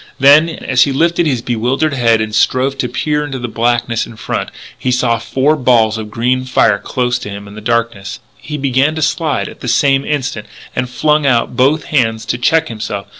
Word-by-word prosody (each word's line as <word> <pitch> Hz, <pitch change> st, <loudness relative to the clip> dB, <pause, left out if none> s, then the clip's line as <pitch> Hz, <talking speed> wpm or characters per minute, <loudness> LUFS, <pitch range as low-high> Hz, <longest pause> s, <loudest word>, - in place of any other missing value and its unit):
Then, 145 Hz, +4 st, +6 dB
as 130 Hz, -5 st, -1 dB
he 140 Hz, -, -2 dB
lifted 170 Hz, +4 st, +1 dB
his 125 Hz, -5 st, -1 dB
bewildered 125 Hz, +6 st, 0 dB
head 115 Hz, -4 st, +2 dB
and 110 Hz, 0 st, -4 dB
strove 130 Hz, +5 st, +1 dB
to 125 Hz, -, -1 dB
peer 150 Hz, -1 st, -1 dB
into 145 Hz, -2 st, -5 dB
the 120 Hz, -1 st, -4 dB
blackness 120 Hz, 0 st, 0 dB
in 115 Hz, -, -12 dB
front, -, -, -4 dB, 0.3 s
he 130 Hz, -, -3 dB
saw 125 Hz, -2 st, +1 dB
four 130 Hz, +6 st, +1 dB
balls 120 Hz, -5 st, +2 dB
of 105 Hz, -1 st, -6 dB
green 125 Hz, +4 st, 0 dB
fire 125 Hz, -5 st, +2 dB
close 125 Hz, 0 st, -1 dB
to 105 Hz, -, -7 dB
him 100 Hz, 0 st, -8 dB
in 105 Hz, +1 st, -11 dB
darkness. 115 Hz, -4 st, -2 dB, 0.2 s
He 150 Hz, +6 st, -6 dB
began 135 Hz, +2 st, +1 dB
to 155 Hz, -, -1 dB
slide 155 Hz, -2 st, -1 dB
at -, -, -11 dB
the -, -, -7 dB
same 135 Hz, +3 st, +2 dB
instant, 135 Hz, -8 st, -3 dB, 0.3 s
and 125 Hz, -, -2 dB
flung 150 Hz, +3 st, +1 dB
out 120 Hz, -2 st, +1 dB
both 140 Hz, +5 st, +2 dB
hands 115 Hz, -6 st, 0 dB
to 120 Hz, 0 st, -2 dB
check 160 Hz, +5 st, +2 dB
himself. 105 Hz, -3 st, -5 dB
125 Hz, 200 wpm, -15 LUFS, 115-140 Hz, 0.3 s, Then